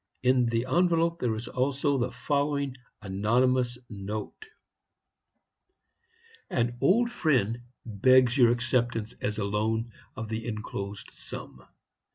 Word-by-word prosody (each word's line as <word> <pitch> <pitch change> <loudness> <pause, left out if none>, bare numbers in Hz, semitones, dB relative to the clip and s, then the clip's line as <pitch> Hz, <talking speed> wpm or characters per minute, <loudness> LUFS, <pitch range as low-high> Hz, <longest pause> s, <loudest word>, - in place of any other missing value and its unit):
In 125 -1 +4
the 115 +1 0
envelope 170 +3 +2
there 125 - 0
was 110 +1 -3
also 140 +2 0
the 125 +1 -1
following 140 -2 -1 0.3
anonymous 120 +5 +1
note: 105 - -6 2.0
"'An 120 0 0
old 235 +5 +3
friend 130 - +1 0.3
begs 125 +3 +4
your 125 -4 +6
acceptance, 120 -2 0
as 105 0 -2
a 105 - -1
loan, 110 +3 -1 0.2
of 115 - -5
the 110 +1 -4
inclosed 105 -2 -5
sum. - - -10
120 Hz, 115 wpm, -28 LUFS, 110-135 Hz, 2.0 s, your